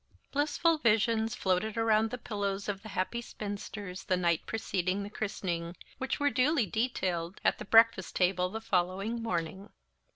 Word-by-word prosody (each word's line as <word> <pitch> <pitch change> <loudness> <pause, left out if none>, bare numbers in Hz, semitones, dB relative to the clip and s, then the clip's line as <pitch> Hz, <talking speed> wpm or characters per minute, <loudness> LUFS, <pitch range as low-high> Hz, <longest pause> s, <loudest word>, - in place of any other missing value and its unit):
Blissful 305 +3 +2
visions 225 -1 +2
floated 190 +4 0
around 225 -1 +3
the 250 - -4
pillows 200 -4 -3
of 200 -2 -3
the 220 - -10
happy 200 +5 -2
spinsters 205 -4 -6
the 185 -2 +1
night 170 -2 +1
preceding 195 -3 -1
the 205 - -7
christening, 175 -5 -3 0.2
which 265 +2 -2
were 285 0 +2
duly 255 +2 +3
detailed 190 -5 -2
at - - +3
the - - -6
breakfast 225 -2 +5
table 180 0 +2
the 220 +3 -5
following 195 +3 0
morning. 190 -2 -3
205 Hz, 155 wpm, -31 LUFS, 185-230 Hz, 0.2 s, breakfast